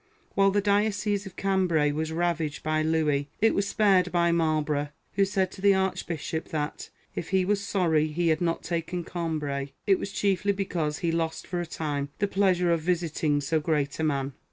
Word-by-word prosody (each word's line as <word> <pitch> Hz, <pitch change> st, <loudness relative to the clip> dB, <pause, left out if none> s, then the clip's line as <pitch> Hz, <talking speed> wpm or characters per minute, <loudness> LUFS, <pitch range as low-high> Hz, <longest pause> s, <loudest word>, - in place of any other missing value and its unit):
AVhile 195 Hz, 0 st, +4 dB
the 205 Hz, +1 st, +2 dB
diocese 205 Hz, 0 st, +1 dB
of 190 Hz, -, -11 dB
Cambray 180 Hz, -6 st, +2 dB
was 160 Hz, +2 st, -2 dB
ravaged 165 Hz, -2 st, -1 dB
by 155 Hz, 0 st, +1 dB
Louis, 155 Hz, -3 st, +1 dB
it 225 Hz, -, +4 dB
was 200 Hz, 0 st, 0 dB
spared 190 Hz, -4 st, +3 dB
by 170 Hz, -1 st, +3 dB
Marlborough; 155 Hz, -3 st, +1 dB, 0.3 s
who 195 Hz, +1 st, +3 dB
said 190 Hz, -1 st, 0 dB
to -, -, -11 dB
the 200 Hz, -1 st, +5 dB
Archbishop 170 Hz, -4 st, -2 dB
that, 150 Hz, -1 st, -4 dB, 0.2 s
if 165 Hz, -, -5 dB
he 190 Hz, -1 st, +2 dB
was 200 Hz, +1 st, +1 dB
sorry 165 Hz, -6 st, +2 dB
he 165 Hz, +2 st, 0 dB
had 160 Hz, +1 st, +1 dB
not 165 Hz, -1 st, 0 dB
taken 170 Hz, +1 st, -3 dB
Cambray, 150 Hz, -6 st, -3 dB
it 195 Hz, -2 st, +4 dB
was 200 Hz, -, -4 dB
chiefly 200 Hz, 0 st, +1 dB
because 170 Hz, -6 st, -2 dB
he 170 Hz, -, -1 dB
lost 165 Hz, -1 st, -2 dB
for 175 Hz, -1 st, -3 dB
a 175 Hz, -, -5 dB
time 145 Hz, -3 st, -3 dB
the 205 Hz, -, +1 dB
pleasure 185 Hz, -3 st, +2 dB
of 165 Hz, -1 st, +1 dB
visiting 160 Hz, -3 st, 0 dB
so 155 Hz, +3 st, +1 dB
great 150 Hz, -2 st, -1 dB
a -, -, 0 dB
man. 140 Hz, -3 st, 0 dB
170 Hz, 190 wpm, -27 LUFS, 155-190 Hz, 0.3 s, the